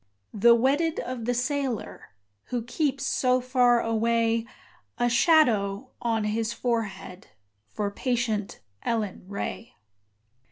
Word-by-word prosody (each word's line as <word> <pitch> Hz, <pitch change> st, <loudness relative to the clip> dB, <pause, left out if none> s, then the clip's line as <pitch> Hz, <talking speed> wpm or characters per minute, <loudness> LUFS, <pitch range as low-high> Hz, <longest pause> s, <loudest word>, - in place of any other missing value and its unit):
The 235 Hz, +3 st, +6 dB
wedded 290 Hz, +7 st, +1 dB
of 250 Hz, -3 st, -5 dB
the 245 Hz, +1 st, 0 dB
sailor 250 Hz, -, -3 dB, 0.3 s
Who 245 Hz, -2 st, -3 dB
keeps 275 Hz, +3 st, -1 dB
so 255 Hz, 0 st, +2 dB
far 245 Hz, -1 st, +3 dB
away: 230 Hz, 0 st, +1 dB, 0.5 s
A 240 Hz, -, +2 dB
shadow 235 Hz, -, +3 dB
on 225 Hz, -2 st, 0 dB
his 220 Hz, +2 st, -1 dB
forehead 225 Hz, -7 st, -3 dB, 0.4 s
For 200 Hz, -, -3 dB
patient 230 Hz, -3 st, -2 dB, 0.2 s
Ellen 215 Hz, -5 st, -2 dB
Ray. 205 Hz, +3 st, -5 dB
235 Hz, 110 wpm, -26 LUFS, 220-255 Hz, 0.5 s, The